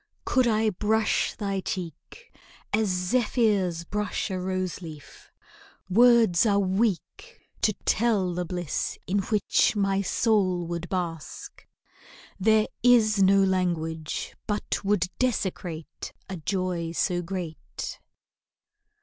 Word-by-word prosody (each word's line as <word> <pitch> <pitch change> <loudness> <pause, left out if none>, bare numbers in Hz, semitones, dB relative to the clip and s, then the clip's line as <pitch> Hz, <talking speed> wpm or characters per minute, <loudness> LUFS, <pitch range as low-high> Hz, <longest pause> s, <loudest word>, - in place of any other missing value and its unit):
Could 255 -2 +3
I 220 -1 +2
brush 215 +3 +1
thy 200 -2 -2
cheek 185 - -7 0.4
As 215 0 +2
zephyrs 195 -2 +1
brush 210 +2 -3
a 185 - -2
rose 185 -1 -3
leaf, 150 -5 -11 0.6
words 230 -4 +5
are 205 -3 +3
weak 200 - -1 0.2
To 215 - +3
tell 205 -5 +2
the 180 +1 -2
bliss 175 -2 -3
in 200 +2 0
which 210 +2 +2
my 195 -1 +1
soul 190 -3 +1
would 170 +1 -5
bask. 170 - -5 0.7
There 215 +2 +4 0.2
is 220 -4 +5
no 195 +1 +5
language 165 -4 -1
but 210 0 -2
would 200 -3 +2
desecrate 180 - -3 0.2
A 190 - -5
joy 175 -1 -2
so 175 +1 0
great. 175 -3 -6
190 Hz, 110 wpm, -26 LUFS, 175-215 Hz, 0.7 s, words